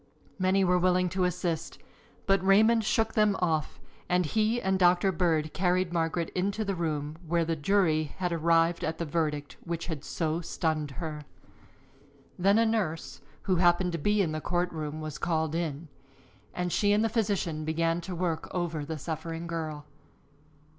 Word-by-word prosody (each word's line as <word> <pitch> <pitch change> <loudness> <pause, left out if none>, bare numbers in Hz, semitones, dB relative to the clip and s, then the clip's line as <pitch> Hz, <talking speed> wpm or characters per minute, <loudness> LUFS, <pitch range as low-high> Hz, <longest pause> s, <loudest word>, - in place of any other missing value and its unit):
Many 190 +1 +3
were 180 -1 +3
willing 180 0 +2
to 185 +1 0
assist, 175 -2 -2 0.5
but 195 -1 +2
Raymond 220 +4 +5
shook 220 +1 +1
them 210 -2 +3
off 160 -5 -1 0.3
and 180 0 +2
he 220 +8 +1
and 190 -3 0
Doctor 180 +1 +4
Bird 160 -4 0
carried 180 -1 +1
Margaret 165 0 -1
into 200 +4 -1
the 200 - -1
room 155 -3 -3
where 170 0 +1
the 165 0 -1
jury 160 -1 +2
had 180 -1 -1
arrived 165 +1 +2
at 160 0 -2
the 170 - -3
verdict 150 -2 -2
which 170 0 -4
had 160 -4 -5
so 165 0 -2
stunned 155 -3 -1
her. 155 -3 -4 1.2
Then 195 +3 +4
a 230 - +4
nurse 205 -8 -2 0.2
who 185 -2 +1
happened 175 +1 +3
to 170 - -3
be 205 +6 +2
in 165 - -1
the 155 0 -3
court 175 +2 -1
room 155 -1 -5
was 155 -2 -6
called 160 -2 0
in, 165 -2 -3 0.6
and 180 0 -3
she 205 +3 +3
and 210 +1 +3
the - - +3
physician 200 -8 -1
began 165 +2 0
to 180 +1 -6
work 170 -2 -2
over 170 -4 -2
the 155 +2 -5
suffering 165 +2 -5
girl. 155 -3 -4
170 Hz, 170 wpm, -28 LUFS, 160-185 Hz, 1.2 s, Raymond